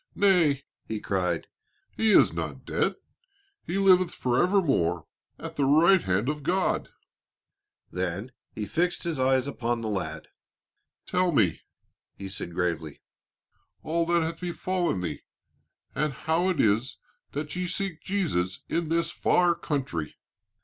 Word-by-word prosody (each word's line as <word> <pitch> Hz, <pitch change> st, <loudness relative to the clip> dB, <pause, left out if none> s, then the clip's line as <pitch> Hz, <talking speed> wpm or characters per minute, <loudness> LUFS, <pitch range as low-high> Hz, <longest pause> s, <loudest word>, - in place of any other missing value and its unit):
"Nay," 170 Hz, -9 st, +3 dB, 0.2 s
he 110 Hz, -1 st, -3 dB
cried, 90 Hz, -5 st, -1 dB, 0.5 s
"he 225 Hz, -, +1 dB
is 210 Hz, -, +6 dB
not -, -, -5 dB
dead, -, -, 0 dB, 0.7 s
he 180 Hz, -, -3 dB
liveth 185 Hz, -2 st, +5 dB
forever 175 Hz, +11 st, +2 dB
more 90 Hz, -, +1 dB, 0.3 s
at -, -, -8 dB
the 140 Hz, -, +2 dB
right 165 Hz, +6 st, +5 dB
hand 95 Hz, +3 st, 0 dB
of 150 Hz, 0 st, -2 dB
God." 180 Hz, +5 st, 0 dB, 1.0 s
Then 95 Hz, +6 st, -3 dB, 0.2 s
he 105 Hz, -, -4 dB
fixed 175 Hz, -, 0 dB
his 165 Hz, -5 st, -2 dB
eyes 130 Hz, 0 st, +3 dB
upon 120 Hz, -4 st, -2 dB
the 110 Hz, -, -3 dB
lad. 80 Hz, -6 st, -4 dB, 0.8 s
"Tell 180 Hz, -1 st, +1 dB
me," 100 Hz, -, +2 dB, 0.5 s
he 100 Hz, -1 st, -7 dB
said 85 Hz, -3 st, -5 dB
gravely, 85 Hz, -4 st, -2 dB, 0.8 s
"all 165 Hz, +1 st, 0 dB
that 170 Hz, -1 st, +3 dB
hath 165 Hz, +1 st, -3 dB
befallen 175 Hz, -, -1 dB
thee, 80 Hz, -5 st, -4 dB, 0.7 s
and 150 Hz, +1 st, 0 dB
how 160 Hz, +7 st, 0 dB
it 180 Hz, -, -1 dB
is 110 Hz, +5 st, +2 dB, 0.4 s
that 150 Hz, +3 st, -4 dB
ye 180 Hz, 0 st, -2 dB
seek 185 Hz, -2 st, -3 dB
Jesus 120 Hz, -, -1 dB
in 170 Hz, -2 st, -1 dB
this 170 Hz, +1 st, +1 dB
far 175 Hz, -1 st, +3 dB
country." 135 Hz, -, -3 dB
145 Hz, 135 wpm, -27 LUFS, -, 1.0 s, is